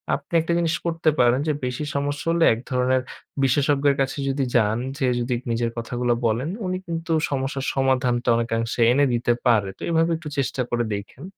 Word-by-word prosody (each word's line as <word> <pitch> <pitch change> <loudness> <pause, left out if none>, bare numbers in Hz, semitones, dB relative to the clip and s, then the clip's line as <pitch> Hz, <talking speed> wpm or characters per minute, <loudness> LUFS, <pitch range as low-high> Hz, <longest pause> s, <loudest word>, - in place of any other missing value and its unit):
আপনি 145 +3 -11
একটা 165 +1 -1
জিনিস 165 -1 +1
করতে 165 -1 +1
পারেন, 125 +1 +4
যে 155 - +2
বেশি 125 +4 -3
সমস্যা 145 +1 -2
হলে 170 0 +3
এক 115 - -5
ধরনের 130 0 +2 0.4
বিশেষজ্ঞের 140 +1 +2
কাছে 135 +1 -1
যদি 135 0 0
যান, 110 -2 +3 0.2
যেয়ে 130 -4 +1
যদি 120 +1 -1 0.2
নিজের 115 0 0
কথাগুলো 120 +1 -1
বলেন, 115 +6 0 0.2
উনি 185 0 -1
কিন্তু 165 0 -4 0.2
সমস্যার 135 0 -2
সমাধানটা 130 -2 +1
অনেকাংশে 115 0 -1
এনে 140 +3 +4
দিতে 120 0 +1
পারে। 110 -5 +3
তো - - -22
এইভাবে 165 0 +2
একটু 160 -2 -8
চেষ্টা 135 -1 -1
করে 120 0 0
দেইখেন। 100 +7 -7
130 Hz, 180 wpm, -23 LUFS, 120-145 Hz, 0.4 s, পারেন